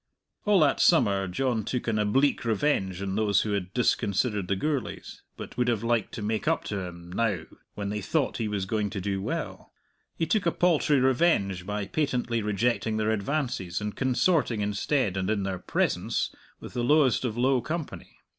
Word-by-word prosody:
All 205 Hz, -2 st, +4 dB
that 150 Hz, -, +3 dB
summer 100 Hz, -, +4 dB
John 115 Hz, +4 st, -1 dB
took 125 Hz, +4 st, -3 dB
an 110 Hz, -2 st, +1 dB
oblique 135 Hz, +7 st, +2 dB
revenge 100 Hz, -5 st, 0 dB
on 95 Hz, -1 st, -2 dB
those 105 Hz, -2 st, +2 dB
who 110 Hz, -, -2 dB
had 95 Hz, -3 st, -2 dB
disconsidered 105 Hz, -3 st, +1 dB
the 100 Hz, -, +1 dB
Gourlays, 140 Hz, +6 st, -3 dB, 0.2 s
but -, -, -8 dB
would 125 Hz, 0 st, +1 dB
have 115 Hz, -3 st, 0 dB
liked 115 Hz, -2 st, 0 dB
to 110 Hz, -, -5 dB
make 110 Hz, +1 st, -2 dB
up -, -, +2 dB
to 100 Hz, -, -3 dB
him 85 Hz, -1 st, -8 dB
now 100 Hz, -4 st, 0 dB, 0.3 s
when 100 Hz, -1 st, -3 dB
they 105 Hz, 0 st, -3 dB
thought 145 Hz, -, 0 dB
he 115 Hz, -, -1 dB
was 100 Hz, -2 st, -2 dB
going 105 Hz, +1 st, -1 dB
to 100 Hz, -, -4 dB
do 95 Hz, 0 st, -2 dB
well -, -, -4 dB, 0.5 s
he 165 Hz, -, +1 dB
took 180 Hz, +2 st, +1 dB
a -, -, +4 dB
paltry 155 Hz, -5 st, +3 dB
revenge 125 Hz, -, +2 dB
by 105 Hz, -1 st, -2 dB
patently 125 Hz, -4 st, -1 dB
rejecting 110 Hz, +1 st, 0 dB
their 110 Hz, 0 st, +1 dB
advances 110 Hz, -, -2 dB
and 105 Hz, 0 st, -4 dB
consorting 130 Hz, -, +1 dB
instead, 105 Hz, +1 st, 0 dB
and 95 Hz, +1 st, -1 dB
in 105 Hz, -2 st, 0 dB
their 95 Hz, -2 st, -3 dB
presence, -, -, -1 dB, 0.3 s
with -, -, -10 dB
the 120 Hz, -, -1 dB
lowest 140 Hz, -1 st, +3 dB
of 120 Hz, -3 st, -2 dB
low 130 Hz, +1 st, +3 dB
company. 160 Hz, +2 st, -6 dB
110 Hz, 185 wpm, -27 LUFS, 100-130 Hz, 0.5 s, All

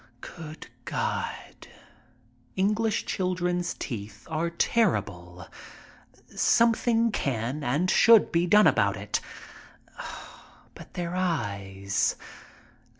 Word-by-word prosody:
Good 160 Hz, -3 st, -9 dB, 0.2 s
God! -, -, -4 dB, 0.9 s
English 210 Hz, +3 st, +1 dB
children's 180 Hz, -1 st, -1 dB
teeth 105 Hz, -4 st, -7 dB
are 160 Hz, +2 st, 0 dB
terrible! 100 Hz, -, -1 dB, 0.9 s
Something 230 Hz, -1 st, +3 dB
can 130 Hz, -, -2 dB
and 145 Hz, +9 st, +1 dB
should 225 Hz, +3 st, +6 dB
be 170 Hz, +1 st, +2 dB
done 210 Hz, +4 st, +6 dB
about 100 Hz, -3 st, +3 dB
it. 100 Hz, +1 st, -2 dB, 1.5 s
But -, -, -14 dB
their 175 Hz, 0 st, -3 dB
eyes. 100 Hz, -, -1 dB
170 Hz, 85 wpm, -27 LUFS, -, 1.5 s, should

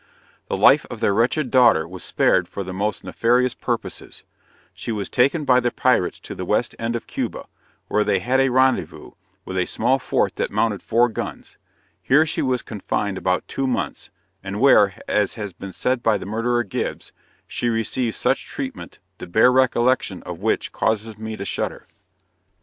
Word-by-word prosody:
The -, -, -2 dB
life 140 Hz, +9 st, +6 dB
of 115 Hz, -, -7 dB
their 110 Hz, -3 st, +2 dB
wretched 125 Hz, +5 st, +1 dB
daughter 115 Hz, -12 st, +5 dB
was 90 Hz, +1 st, -8 dB
spared -, -, +2 dB
for 100 Hz, -, -5 dB
the 95 Hz, 0 st, -6 dB
most 100 Hz, +2 st, -2 dB
nefarious 125 Hz, +2 st, +1 dB
purposes -, -, -5 dB, 0.5 s
she -, -, -5 dB
was 105 Hz, -3 st, -3 dB
taken 140 Hz, +5 st, +2 dB
by 125 Hz, -2 st, +5 dB
the 120 Hz, -1 st, +1 dB
pirates 120 Hz, -7 st, +1 dB
to -, -, -7 dB
the -, -, -6 dB
west -, -, 0 dB
end 115 Hz, +1 st, -2 dB
of 120 Hz, -, -4 dB
Cuba, -, -, -4 dB, 0.4 s
where 105 Hz, -, +2 dB
they 100 Hz, -, +2 dB
had 125 Hz, +8 st, +1 dB
a 135 Hz, 0 st, +3 dB
rendezvous, 130 Hz, +1 st, +1 dB, 0.3 s
with 95 Hz, 0 st, -3 dB
a 90 Hz, -, 0 dB
small 130 Hz, +4 st, +1 dB
fort -, -, 0 dB
that -, -, -1 dB
mounted 105 Hz, -4 st, 0 dB
four 120 Hz, +2 st, +3 dB
guns 110 Hz, -, -7 dB, 0.4 s
here 140 Hz, -, +4 dB
she 160 Hz, -, -2 dB
was 130 Hz, -2 st, 0 dB
confined 100 Hz, -2 st, -3 dB
about 90 Hz, -1 st, 0 dB
two 135 Hz, -1 st, -2 dB
months, 95 Hz, -, -3 dB, 0.3 s
and 100 Hz, +1 st, -5 dB
where, 105 Hz, -7 st, +5 dB
as 105 Hz, -2 st, +1 dB
has 105 Hz, -4 st, -6 dB
been 95 Hz, +3 st, -8 dB
said 125 Hz, +5 st, -1 dB
by 110 Hz, -3 st, +2 dB
the -, -, -8 dB
murderer 115 Hz, +4 st, 0 dB
Gibbs, 100 Hz, -, -4 dB, 0.3 s
"she 120 Hz, -, -2 dB
received 115 Hz, +1 st, -1 dB
such -, -, 0 dB
treatment, -, -, -6 dB, 0.2 s
the -, -, -7 dB
bare 110 Hz, +8 st, +5 dB
recollection 130 Hz, -1 st, +2 dB
of -, -, -7 dB
which -, -, -1 dB
causes 110 Hz, 0 st, -1 dB
me 110 Hz, 0 st, -5 dB
to 100 Hz, -, -5 dB
shudder!" -, -, -3 dB
115 Hz, 180 wpm, -22 LUFS, 100-125 Hz, 0.5 s, life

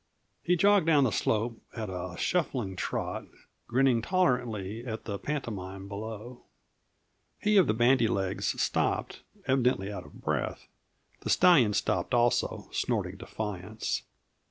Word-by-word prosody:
He 180 Hz, -, +2 dB
jogged 200 Hz, -1 st, +4 dB
down 150 Hz, -4 st, +5 dB
the 125 Hz, -, +2 dB
slope 115 Hz, +2 st, 0 dB, 0.2 s
at 110 Hz, -2 st, -3 dB
a 90 Hz, -1 st, -5 dB
shuffling 130 Hz, -, -1 dB
trot, -, -, -3 dB, 0.4 s
grinning 125 Hz, -1 st, +3 dB
tolerantly 120 Hz, -, 0 dB
at 110 Hz, -3 st, -5 dB
the 100 Hz, -3 st, -4 dB
pantomime 100 Hz, -9 st, -4 dB
below. 110 Hz, +4 st, -7 dB, 1.0 s
He 210 Hz, 0 st, +2 dB
of 190 Hz, -4 st, +6 dB
the 105 Hz, -, +2 dB
bandy 120 Hz, 0 st, +4 dB
legs 95 Hz, -3 st, -1 dB
stopped, -, -, 0 dB, 0.2 s
evidently 125 Hz, -6 st, +1 dB
out -, -, -7 dB
of -, -, -16 dB
breath; -, -, -3 dB, 0.5 s
the -, -, -5 dB
stallion 135 Hz, -13 st, +6 dB
stopped 95 Hz, +3 st, 0 dB
also, 120 Hz, 0 st, +1 dB
snorting -, -, -1 dB
defiance. 105 Hz, 0 st, -4 dB
115 Hz, 130 wpm, -29 LUFS, 100-135 Hz, 1.0 s, of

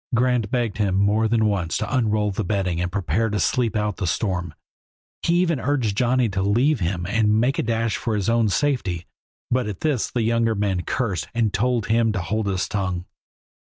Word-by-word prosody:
Grant 125 Hz, -3 st, +1 dB
begged 120 Hz, -5 st, -1 dB
him 100 Hz, -3 st, +1 dB
more 105 Hz, +3 st, +2 dB
than 110 Hz, 0 st, +2 dB
once 95 Hz, -6 st, 0 dB
to 110 Hz, +4 st, -2 dB
unroll 105 Hz, -4 st, +1 dB
the 95 Hz, -, -2 dB
bedding 90 Hz, -3 st, -1 dB
and 90 Hz, 0 st, -2 dB
prepare 105 Hz, +4 st, 0 dB
to 105 Hz, 0 st, -1 dB
sleep 115 Hz, +2 st, +1 dB
out 105 Hz, -2 st, -1 dB
the 95 Hz, -, -2 dB
storm; 90 Hz, -4 st, -2 dB, 0.7 s
he 170 Hz, -, +1 dB
even 170 Hz, -5 st, +2 dB
urged 125 Hz, -5 st, 0 dB
Johnny 125 Hz, +2 st, +2 dB
to 95 Hz, -1 st, -2 dB
leave 120 Hz, +8 st, +2 dB
him 85 Hz, -1 st, -2 dB
and 110 Hz, +1 st, +2 dB
make 125 Hz, +4 st, +1 dB
a -, -, +3 dB
dash 115 Hz, -1 st, 0 dB
for 115 Hz, -3 st, -2 dB
his 100 Hz, -3 st, -1 dB
own 115 Hz, -2 st, +3 dB
safety, 95 Hz, -, 0 dB, 0.5 s
but 125 Hz, -2 st, +1 dB
at 100 Hz, -4 st, -6 dB
this 145 Hz, -7 st, 0 dB
the 120 Hz, -, -1 dB
younger 115 Hz, 0 st, +1 dB
man 100 Hz, -3 st, 0 dB
cursed 100 Hz, -, -2 dB
and 115 Hz, -3 st, +1 dB
told 120 Hz, +1 st, +1 dB
him 115 Hz, 0 st, +2 dB
to 100 Hz, -, -1 dB
hold 105 Hz, +4 st, -2 dB
his 95 Hz, -1 st, -1 dB
tongue. 95 Hz, -3 st, -2 dB
110 Hz, 200 wpm, -23 LUFS, 95-120 Hz, 0.7 s, a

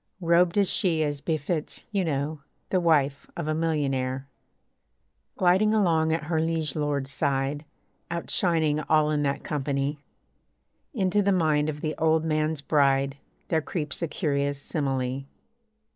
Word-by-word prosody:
Robed 170 Hz, +1 st, +3 dB
is 200 Hz, -1 st, +4 dB
she, 165 Hz, -4 st, +1 dB
as 145 Hz, -2 st, -2 dB
befits, 155 Hz, +1 st, -2 dB
you 200 Hz, -2 st, +1 dB
know, 150 Hz, -1 st, -2 dB, 0.3 s
The 185 Hz, -, +3 dB
wife 145 Hz, -5 st, +1 dB
of 170 Hz, -3 st, -3 dB
a 155 Hz, -, +1 dB
millionaire. 135 Hz, -5 st, -1 dB, 1.1 s
Gliding 190 Hz, +4 st, +4 dB
along 165 Hz, -6 st, +3 dB
at 160 Hz, 0 st, 0 dB
her 160 Hz, +1 st, 0 dB
liege 160 Hz, -3 st, -1 dB
lord's 145 Hz, -3 st, -1 dB
side, 140 Hz, +2 st, -1 dB, 0.4 s
Out 170 Hz, 0 st, -4 dB
shining 160 Hz, -4 st, +2 dB
all 155 Hz, 0 st, +2 dB
in 150 Hz, -1 st, +1 dB
that 140 Hz, -1 st, -1 dB
company, 140 Hz, 0 st, -2 dB, 0.9 s
Into 205 Hz, -, +1 dB
the 200 Hz, 0 st, +2 dB
mind 155 Hz, -4 st, +2 dB
of 150 Hz, -1 st, -5 dB
the 155 Hz, -1 st, -1 dB
old 160 Hz, 0 st, +2 dB
man's 155 Hz, -1 st, 0 dB
bride 140 Hz, -2 st, +2 dB, 0.3 s
There 160 Hz, -1 st, +2 dB
creeps 150 Hz, -1 st, -4 dB
a 170 Hz, -, 0 dB
curious 140 Hz, -4 st, -1 dB
simile. 135 Hz, -2 st, -2 dB
155 Hz, 145 wpm, -26 LUFS, 140-165 Hz, 1.1 s, is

